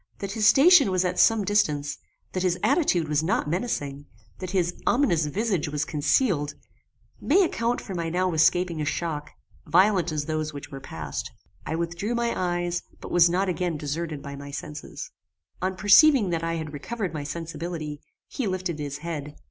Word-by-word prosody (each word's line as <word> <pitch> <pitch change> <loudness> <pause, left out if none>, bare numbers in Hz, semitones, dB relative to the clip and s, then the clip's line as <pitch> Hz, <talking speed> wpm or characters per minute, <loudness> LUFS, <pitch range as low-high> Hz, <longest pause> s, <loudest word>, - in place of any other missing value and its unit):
That 200 -1 -5
his 215 0 +2
station 295 - +7
was 185 -1 +1
at 180 0 -1
some 225 -3 +4
distance, 150 -8 +1 0.3
that 185 - -1
his 180 -1 +1
attitude 180 - +2
was 150 0 +1
not 165 -1 0
menacing, 145 - -3 0.3
that 185 - -5
his 180 -2 0
ominous 175 - +2
visage 190 -2 -1
was 150 +1 -1
concealed, 150 - +1 0.6
may 380 +7 +4
account 240 -8 0
for 195 - -7
my 170 -2 -2
now 180 +1 0
escaping 170 +1 +2
a - - -1
shock, 150 -2 -3 0.4
violent 180 +2 +3
as 150 -1 -2
those 155 -1 -2
which 145 - -9
were 135 - -7
past. 80 - -5 0.4
I 160 - -1
withdrew 170 +7 -2
my 235 0 0
eyes, 175 -1 -1 0.2
but - - -9
was 175 -1 +6
not 185 +3 +1
again 180 -2 -1
deserted 150 0 -4
by 140 -1 -7
my 140 0 -9
senses. 150 +1 -7 0.5
On 185 +1 -1
perceiving 210 - +6
that 165 -1 -1
I 165 0 -1
had 155 -2 -5
recovered 190 +5 -4
my 150 -2 -4
sensibility, 160 -1 -5 0.3
he 255 - -3
lifted 185 -4 -3
his 145 -1 -4
head. 150 -3 -5
170 Hz, 175 wpm, -25 LUFS, 150-190 Hz, 0.6 s, station